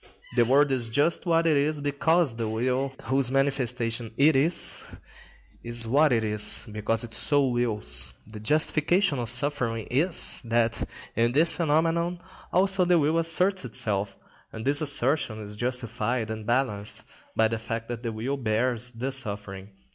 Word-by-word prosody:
The 120 -1 +4
world 140 +3 +3
is 120 -3 0
just 145 +9 +1
what 165 0 +2
it 160 -2 +3
is 145 +2 +1
because 145 0 +1
the 115 -1 -3
will, 125 +4 -1
whose 130 +1 +1
manifestation 125 -4 -1
it 150 +1 +4
is, 160 +6 0 0.8
is 120 0 -4
what 145 +5 +3
it 115 -2 +2
is, 105 +2 +2
because 110 +2 -1
it 115 -2 -7
so 145 -2 +2
wills. 105 - 0
The 110 0 -10
justification 155 - +1
of 120 -2 -1
suffering 125 -3 +2
is, 160 +8 +1
that 115 0 0 0.3
in 115 +1 +1
this 160 +4 +4
phenomenon 165 +2 0 0.3
also 190 +1 +3
the 175 0 +3
will 155 +2 +2
asserts 180 +3 +1
itself; 105 -4 -2 0.4
and 110 - -8
this 145 +2 +2
assertion 140 -5 +1
is 105 -1 -7
justified 120 -1 -2
and 110 -1 -7
balanced 120 -5 -1 0.3
by 110 - +4
the 115 0 -3
fact 115 +1 -5
that 120 -1 -5
the 115 -2 -3
will 120 +6 -3
bears 120 0 -1
the 125 +3 -4
suffering. 100 -6 -5
125 Hz, 155 wpm, -26 LUFS, 115-145 Hz, 0.8 s, The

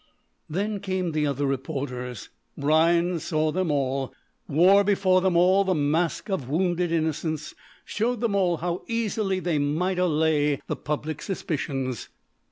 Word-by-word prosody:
Then 200 +5 -2
came 185 -3 -2
the 150 -1 0
other 140 0 -1
reporters. 130 -4 -4 0.3
Rhinds 165 +3 +2
saw 155 -2 +1
them 185 +1 -1
all, 135 -2 -1 0.3
wore 185 +7 +5
before 190 -2 +3
them 185 -2 +2
all 185 +3 +5
the 190 -1 +1
mask 155 +3 0
of 185 - -3
wounded 175 +2 0
innocence, 155 -1 -2 0.3
showed 235 +2 -1
them 230 -3 0
all 180 -4 +2
how 175 +2 -3
easily 215 -4 -1
they 170 -5 0
might 170 +6 0
allay 155 -4 +2
all - - -2
public 150 +1 -4
suspicions. 135 - -3
165 Hz, 140 wpm, -25 LUFS, 145-185 Hz, 0.3 s, wore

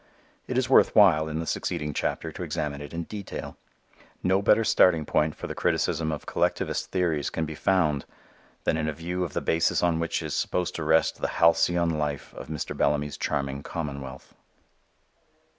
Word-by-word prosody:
It - - -2
is - - +2
worth - - +5
while, 80 -7 +6
in 80 - -3
the 80 - -3
succeeding 75 -2 -2
chapter 80 +3 -2
to - - -9
examine 75 -4 -3
it 75 0 -8
in 85 0 -4
detail. 100 +3 -7 0.7
No 95 +2 +3
better 105 +2 +4
starting 85 -7 +4
point 75 +1 +1
for - - -7
the - - -4
criticism 80 -1 0
of 75 - -5
collectivist - - -1
theories 85 -6 0
can 80 - -2
be 80 - -6
found 75 -4 +1 0.6
than 80 - +1
in 75 -1 -1
a 80 - -1
view 90 +4 -3
of 85 - -5
the - - -1
basis 85 +1 +1
on 85 -2 +2
which 85 0 -1
is - - -4
supposed 90 -1 -1
to 80 - -3
rest 80 +1 +2
the - - +1
halcyon 85 -1 +3
life 75 -2 -3
of - - -9
Mr. 75 -1 -4
Bellamy's 75 0 0
charming 70 0 -2
commonwealth. 70 -4 -6
80 Hz, 180 wpm, -26 LUFS, 75-85 Hz, 0.7 s, while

